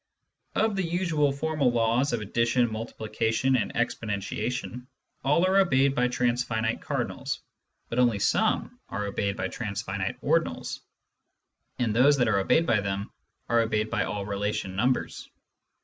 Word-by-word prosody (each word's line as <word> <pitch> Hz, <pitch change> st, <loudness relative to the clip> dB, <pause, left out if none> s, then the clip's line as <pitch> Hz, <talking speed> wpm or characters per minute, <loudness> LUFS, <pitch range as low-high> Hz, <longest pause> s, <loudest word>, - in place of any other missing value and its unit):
Of 220 Hz, -2 st, +2 dB
the 195 Hz, -, 0 dB
usual 165 Hz, -4 st, +1 dB
formal 140 Hz, -2 st, +1 dB
laws 120 Hz, +3 st, +2 dB
of 120 Hz, -2 st, -1 dB
addition, 115 Hz, +3 st, +1 dB
multiplication, 115 Hz, +3 st, -1 dB
and 110 Hz, -6 st, 0 dB
ex 120 Hz, +1 st, +1 dB
ponentiation, 115 Hz, +4 st, -4 dB, 0.4 s
all 150 Hz, +6 st, +3 dB
are 190 Hz, +1 st, +4 dB
obeyed 140 Hz, -7 st, +3 dB
by 125 Hz, -1 st, +2 dB
transfinite 120 Hz, -2 st, 0 dB
cardinals, -, -, -3 dB, 0.5 s
but 115 Hz, -, -2 dB
only 120 Hz, -4 st, +4 dB
some 100 Hz, -, +1 dB
are 105 Hz, 0 st, -3 dB
obeyed 100 Hz, 0 st, -2 dB
by 95 Hz, -, -1 dB
transfinite 100 Hz, -3 st, -4 dB
ordinals, -, -, 0 dB, 1.0 s
and 115 Hz, -4 st, 0 dB
those 140 Hz, +4 st, +5 dB
that 125 Hz, -3 st, +2 dB
are 100 Hz, -3 st, +3 dB
obeyed 160 Hz, +12 st, +3 dB
by 115 Hz, -8 st, +3 dB
them 100 Hz, 0 st, -3 dB, 0.4 s
are 120 Hz, -, +3 dB
obeyed 110 Hz, -1 st, 0 dB
by 115 Hz, -3 st, +1 dB
all 100 Hz, 0 st, -3 dB
relation 100 Hz, -2 st, -2 dB
numbers. 125 Hz, +6 st, -1 dB
115 Hz, 145 wpm, -27 LUFS, 105-130 Hz, 1.0 s, those